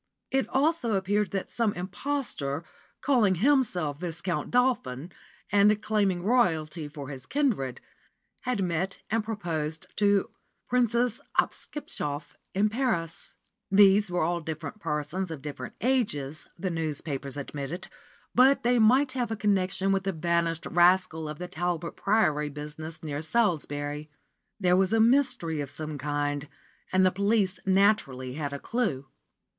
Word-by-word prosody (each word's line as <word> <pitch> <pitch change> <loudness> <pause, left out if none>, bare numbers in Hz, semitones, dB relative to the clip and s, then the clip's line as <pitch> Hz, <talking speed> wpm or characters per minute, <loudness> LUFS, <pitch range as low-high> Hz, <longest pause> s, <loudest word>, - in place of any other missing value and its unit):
It 270 0 +1
also 270 -5 +1
appeared 200 +2 +1
that 195 -1 -4
some 230 -4 +1
impostor, 180 - -3 0.4
calling 230 -9 +3
himself 185 - +2
Viscount 175 +1 -2
Dolphin, 185 - +1 0.4
and 205 +1 +5
claiming 200 -5 +1
Royalty 165 -9 +1
for 145 -2 -8
his 130 -3 -8
kindred, 225 - 0 0.6
had 245 -6 -1
met 180 +2 -1
and 225 0 +1
proposed 165 -8 -3
to 200 -1 +3 0.4
Princess 240 -1 +1 0.2
Hopskipschoff 150 - -2 0.2
in 205 +2 +4
Paris. 215 -9 -2 0.3
These 200 0 +6
were 180 -2 0
all 170 +1 0
different 160 +4 -6
persons 155 +4 -2
of 155 -4 -7
different 140 -4 -6
ages, 160 - 0
the 185 +1 -2
newspapers 145 -4 -3
admitted, 145 +4 -5 0.5
but 265 +2 +5
they 245 0 +3
might 255 +5 +5
have 250 -3 -1
a 225 - -1
connection 195 -2 +1
with 195 0 +1
the 195 - +1
vanished 170 0 0
rascal 175 -2 +3
of 150 - -6
the 180 - -5
Talbot 175 -1 -3
Priory 155 -8 +2
business 150 +3 -7
near 150 -1 -3
Salisbury. 150 -6 -1 0.5
There 180 -2 +4
was 190 +3 +2
a 225 - +4
mystery 225 - +3
of 140 - -5
some 150 0 -4
kind, 145 +1 -2 0.4
and 185 0 +4
the 185 - +4
police 200 -1 +1
naturally 190 -11 +2
had 145 0 -3
a 140 - -4
clue. 175 - -1
180 Hz, 135 wpm, -28 LUFS, 150-215 Hz, 0.6 s, These